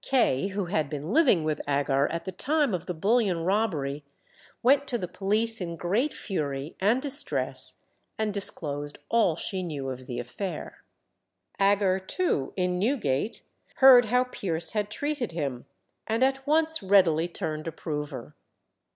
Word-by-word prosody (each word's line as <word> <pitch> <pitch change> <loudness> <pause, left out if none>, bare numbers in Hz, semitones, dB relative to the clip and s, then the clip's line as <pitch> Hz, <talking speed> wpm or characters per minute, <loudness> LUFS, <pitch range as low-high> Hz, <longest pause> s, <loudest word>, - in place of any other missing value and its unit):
Kay, 195 - +2
who 200 -1 -3
had 160 -5 -1
been 150 +5 -4
living 260 - +4
with 155 -1 -1
Agar 140 -1 +2
at 170 0 -4
the 190 - -4
time 285 - +1
of 180 -1 -3
the 180 - -2
bullion 195 -1 +1
robbery, 165 -8 -1 0.6
went 280 +3 +4
to 240 - +1
the 180 - -4
police 215 +4 0
in 170 -2 -4
great 205 - 0
fury 145 -6 -4
and 215 +6 +3
distress, 285 +1 -1 0.3
and 215 -1 -1
disclosed 145 -7 -3
all 225 -8 +3
she 185 +3 -3
knew 145 -6 -4
of 130 0 -8
the 120 - -5
affair. 150 - -6 0.8
Agar 195 -1 +3
too, 190 - -1
in 180 -1 0
Newgate, 215 - 0 0.3
heard 260 -3 +8
how 250 +3 +3
Pierce 170 -9 -2
had 210 -1 -1
treated 285 - -3
him, 135 -7 -4 0.4
and 225 +3 +1
at 270 +1 0
once 320 +1 +2
readily 180 -5 +4
turned 160 -3 -4
approver. 150 -5 -5
190 Hz, 150 wpm, -27 LUFS, 155-230 Hz, 0.8 s, heard